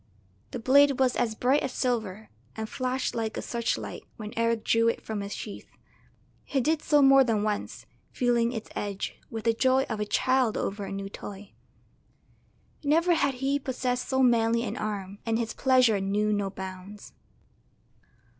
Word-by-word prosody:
The - - -5
blade 275 +3 +5
was 260 -2 +2
as 225 -3 0
bright 260 +6 +2
as 265 - -2
silver, 220 -5 -2 0.3
and 220 0 -4
flashed 255 +2 -2
like 225 -2 -3
a - - -2
searchlight 235 -1 -3 0.2
when 215 -1 -7
Eric 230 -1 0
drew 230 0 +3
it 230 - +1
from 215 -2 -5
its 200 +1 -5
sheath. 210 - -8 0.7
He 275 - -1
did 305 +4 +1
so 295 -2 +4
more 270 0 +7
than 220 -4 0
once, 210 -1 -3 0.3
feeling 240 -1 +1
its 225 -3 -6
edge, 200 -1 -4
with 225 -1 -5
the 230 0 +3
joy 260 +3 +3
of 220 -2 -3
a 210 - -1
child 255 -1 +2
over 200 0 -3
a - - -7
new 195 0 -4
toy. 200 0 -9 1.3
Never 330 +4 +3
had 280 -5 +1
he 270 +2 0
possessed 255 -2 -2
so 265 -1 +2
manly 230 -1 +3
an - - -3
arm, 200 -2 -4
and 225 -1 0
his 230 -1 -2
pleasure 255 -5 +3
knew 210 +2 +1
no 200 -1 -1
bounds. 190 +1 -9
230 Hz, 170 wpm, -27 LUFS, 210-260 Hz, 1.3 s, more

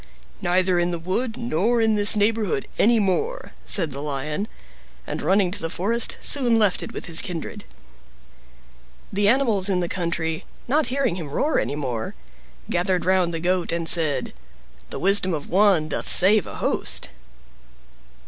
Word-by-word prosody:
"Neither 180 0 +1
in 175 0 0
the 175 - -3
wood 220 +8 -3
nor 235 0 0
in 225 -1 +2
this 205 0 +2
neighborhood 210 -1 0
any 230 +1 +4
more," 440 - -2
said 165 -7 +2
the 140 +1 -6
Lion, 150 +6 -4 0.6
and - - -5
running 190 +2 +1
to 205 - -5
the 165 - -3
forest, 225 +8 +1
soon 245 -5 +4
left 210 -4 +1
it - - -7
with - - -7
his 165 -2 +4
kindred. 170 -3 -6 1.5
The 200 +1 +2
animals 220 -5 +3
in 185 -2 +1
the 175 - -2
country, 165 -2 -3 0.2
not 295 +4 +1
hearing 260 -8 -1
him 160 -5 -7
roar 295 - 0
any - - -3
more, 125 -6 -4 0.5
gathered 180 0 -1
round 185 -2 +2
the 165 - -4
Goat, 180 +1 -1
and 165 -1 -3
said, 150 -7 +3 0.6
"The - - -6
wisdom 190 -2 +2
of 150 - -8
one 190 -4 +3
doth - - -4
save 200 +3 +6
a - - -9
host." - - -2
185 Hz, 160 wpm, -22 LUFS, 165-215 Hz, 1.5 s, save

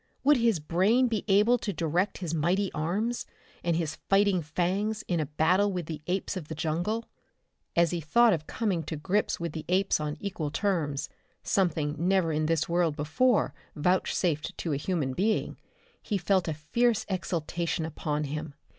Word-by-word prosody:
Would 290 +1 +5
his 230 -6 +2
brain 190 +11 +3
be 225 -3 -1
able 210 +5 +4
to 210 - -2
direct 175 +3 0
his 170 -4 -4
mighty 180 +5 +1
arms 205 +10 -1 0.4
and 170 -1 +1
his 160 -2 -2
fighting 195 -2 +4
fangs 190 +8 -1
in 175 -2 0
a 155 - -1
battle 180 +7 +2
with 180 -3 -3
the 155 -1 -6
apes 190 +2 -1
of 175 -5 -5
the 160 - -5
jungle? 175 +9 -1 0.7
As 170 -1 +4
he 175 -1 -2
thought 230 +9 +4
of 155 -2 -3
coming 200 -7 -1
to - - -4
grips 190 +7 0
with 170 -1 -3
the 155 0 -6
apes 190 0 +2
on 150 -1 -3
equal 185 -7 -3
terms, 160 -6 -1 0.4
something 155 -6 +1
never 180 -1 +2
in 155 0 0
this 165 -1 +1
world 170 -3 +1
before 205 +12 +2 0.2
vouchsafed 170 -1 0
to 165 - -2
a - - +1
human 145 -2 -1
being, 210 +8 0 0.4
he 205 - -1
felt 190 -1 +1
a 160 - 0
fierce 220 +9 +1
exaltation 170 -3 -2
upon 150 -1 -2
him. 150 0 -5
175 Hz, 170 wpm, -28 LUFS, 155-200 Hz, 0.7 s, Would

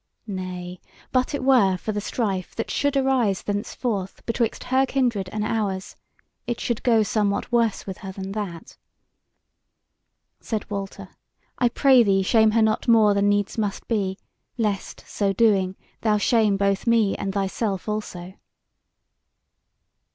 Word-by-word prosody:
Nay, 185 -3 -6 0.3
but 255 +3 +1
it 280 - -4
were 235 -9 +4
for 215 - -4
the 205 -1 -2
strife 200 -5 -2
that 225 - -3
should 285 -1 +1
arise 255 -8 +1
thenceforth 205 -1 -3
betwixt 230 -1 -1
her 260 +1 +2
kindred 240 -8 0
and 210 -1 -2
ours, 200 -4 -2 0.5
it 240 -1 -2
should 235 -3 -2
go 230 -3 +4
somewhat 205 +1 -1
worse 230 -3 +1
with 190 -2 -7
her 195 -3 -7
than 190 0 -6
that." 195 -5 -6 1.6
Said 220 -2 -4
Walter: 195 -1 -5 0.5
"I 245 - +3
pray 260 +1 +5
thee 195 -3 +3
shame 220 +2 +4
her 220 +1 +3
not 220 +2 0
more 220 -3 +5
than 200 0 +2
needs 205 +2 0
must 205 -2 -3
be, 195 -4 -1 0.4
lest, 210 -4 -2
so 200 -2 -1
doing, 190 -3 +2 0.3
thou 215 -2 +2
shame 210 -2 +3
both 200 +2 0
me 225 -4 +3
and 195 - -3
thyself 195 +1 -2
also." 190 -4 -5
210 Hz, 145 wpm, -24 LUFS, 195-230 Hz, 1.6 s, pray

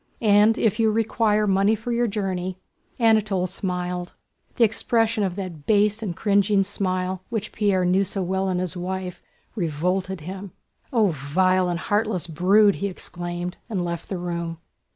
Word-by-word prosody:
"And 210 +1 +5
if 220 0 +1
you 225 -1 +4
require 215 -1 +1
money 195 +2 +3
for 220 +3 -5
your 240 0 +1
journey..." 190 -3 -3 0.4
Anatole 215 -5 +3
smiled. 180 -1 -3 0.4
The 240 - +3
expression 225 0 +1
of 185 -3 -1
that 180 -7 -7
base 210 +1 +3
and 190 -6 -3
cringing 200 0 +3
smile, 185 -1 -2
which 220 -3 -3
Pierre 195 -3 +1
knew 185 +2 +3
so 195 0 -3
well 190 +1 -1
in 185 - 0
his 180 -1 -2
wife, 180 0 -4 0.3
revolted 180 +1 -1
him. 190 +3 -7 0.4
"Oh, 220 -5 +3
vile 180 +5 +1
and 175 -1 -1
heartless 205 -2 0
brood!" 195 +6 +4
he 200 - +1
exclaimed, 175 -1 -5
and 190 -5 -1
left 170 -1 -5
the 190 - -2
room. 170 -1 -4
190 Hz, 155 wpm, -24 LUFS, 180-210 Hz, 0.4 s, And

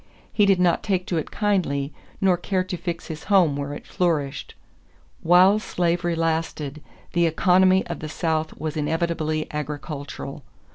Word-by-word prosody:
He 205 -2 +4
did 195 -2 +4
not 180 -2 +3
take 185 -3 -1
to 175 - -1
it 155 - -5
kindly 170 -9 0 0.3
nor 190 -2 +4
care 185 +1 -1
to 185 0 -4
fix 170 0 -4
his 160 -1 -7
home 185 -8 +4
where 140 0 -4
it - - -10
flourished. 150 -6 -1 0.7
While 185 +5 +6
slavery 175 -3 0
lasted, 160 -3 -2 0.3
the 170 -1 +3
economy 185 +3 +4
of 170 - -5
the 155 - -6
South 160 -1 -2
was 155 +1 -4
inevitably 155 0 -1
agricultural. 145 -1 -6
165 Hz, 150 wpm, -24 LUFS, 155-180 Hz, 0.7 s, While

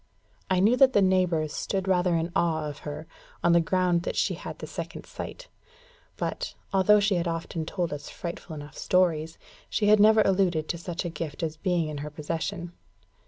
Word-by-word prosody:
I 185 -1 +3
knew 215 +6 +5
that 265 -1 +6
the 205 - +5
neighbours 180 -5 +2
stood 195 -1 -2
rather 180 -2 +2
in 165 +1 -1
awe 160 -4 +1
of 145 -1 -7
her, 150 +2 -6 0.4
on 175 - +4
the 170 - +5
ground 180 0 +2
that - - -3
she - - +1
had - - -7
the - - -7
second - - -7
sight; - - -8 0.7
but, - - -3 0.2
although 195 +2 +5
she 200 -3 +2
often 165 -1 -3
told 175 -4 -2
us 145 0 -7
frightful 170 -1 -7
enough 145 -1 -9
stories, 165 -3 +1 0.3
she 205 -1 +1
had 215 0 +6
never 215 +1 +6
alluded 185 -5 +2
to 170 - -2
such 175 +1 -4
a - - -1
gift 165 0 -5
as 160 -1 -2
being 175 -1 0
in 150 -1 -5
her 150 +1 -5
possession. 170 +4 -4
175 Hz, 190 wpm, -27 LUFS, 160-190 Hz, 0.7 s, that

